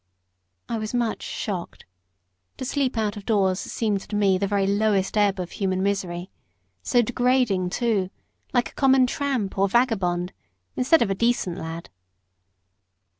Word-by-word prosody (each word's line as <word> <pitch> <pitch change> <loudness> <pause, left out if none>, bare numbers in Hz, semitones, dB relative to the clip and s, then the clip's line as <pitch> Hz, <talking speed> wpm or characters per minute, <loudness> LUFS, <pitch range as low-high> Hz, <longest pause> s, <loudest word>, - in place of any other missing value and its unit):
I 230 -1 -2
was 215 +2 -4
much 235 -2 0
shocked. 185 -5 -5 0.7
To 260 - -5
sleep 270 -2 -1
out 210 -2 -1
of 205 - -8
doors 195 -3 +2
seemed 210 -3 -1
to 210 - -3
me 195 -2 +3
the 200 - 0
very 200 -1 +1
lowest 200 -1 +1
ebb 200 -2 +2
of 180 -1 -4
human 190 -1 -1
misery: 185 -2 -2 0.5
so 240 - +3
degrading, 245 -6 +1
too 205 -3 0 0.4
like 245 -1 +1
a - - -27
common 265 -2 +4
tramp 255 -8 -2
or 195 0 +3
vagabond, 190 -7 +1 0.4
instead 275 +6 +4
of 195 - -1
a - - +3
decent 195 -4 0
lad. 165 - -7
205 Hz, 150 wpm, -24 LUFS, 190-240 Hz, 0.7 s, common